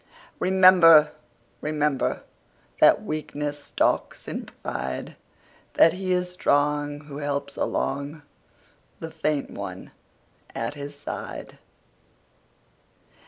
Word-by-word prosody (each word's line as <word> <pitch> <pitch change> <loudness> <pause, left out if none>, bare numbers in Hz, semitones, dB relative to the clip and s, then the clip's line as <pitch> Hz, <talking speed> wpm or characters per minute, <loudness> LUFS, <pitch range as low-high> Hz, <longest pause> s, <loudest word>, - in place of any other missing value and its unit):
Remember, 180 -5 +7 0.5
rememberThat 150 -2 0
weakness 150 -1 -4
stalks - - -1
in - - -5 0.2
pride; - - -4 0.6
That 165 - +6
he 185 0 -3
is 180 0 0
strong 145 -3 0
who 145 -1 -9
helps 145 -1 -3
alongThe 140 +2 -2 0.9
faint 155 -3 -1
one - - -7 0.6
at 115 +3 -3
his 145 0 -8
side. 145 - -7
150 Hz, 80 wpm, -25 LUFS, 145-165 Hz, 0.9 s, Remember